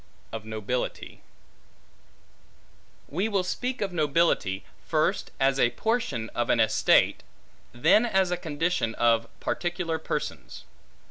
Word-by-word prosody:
Of 110 -1 -6
Nobility 110 +3 -4 1.9
WE 190 +9 -1
WILL 200 -3 +1
speak 250 +7 -3
of 195 -3 -2
nobility, 150 - +1 0.2
first - - +1
as 135 0 +2
a 120 - +5
portion 145 - -1
of 120 -1 -2
an - - +3
estate, 110 - +3 0.5
then 210 - +4
as 190 -4 +2
a - - +2
condition 160 -7 -1
of 115 -1 +3
particular 175 -2 -2
persons. - - -5
150 Hz, 115 wpm, -27 LUFS, 115-180 Hz, 1.9 s, a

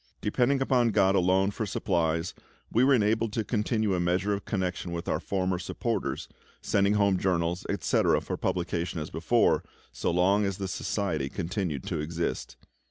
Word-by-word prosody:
Depending 130 +5 +1
upon 125 -3 +3
GOD 95 -3 +3
alone 95 +1 +3
for 110 +1 -3
supplies, 85 -3 0 0.4
we 120 - +3
were 135 +1 +5
enabled 110 0 +1
to 115 - 0
continue 110 -1 0
a 90 - 0
measure 90 +4 +1
of 100 -1 -4
connection 90 -3 -2
with 85 0 -5
our - - 0
former 95 -2 -1
supporters, - - -3 0.3
sending 100 0 +2
home 100 -3 +3
journals, 90 -1 0
etc., - - +2
for - - -4
publication 85 -1 -2
as 75 - -6
before, 100 +9 +2 0.3
so - - -2
long 95 +4 +3
as 100 -2 -1
the 95 - -3
Society 85 -7 -2
continued 85 - -3
to - - -3
exist. 85 +3 -3
95 Hz, 165 wpm, -28 LUFS, 85-105 Hz, 0.4 s, were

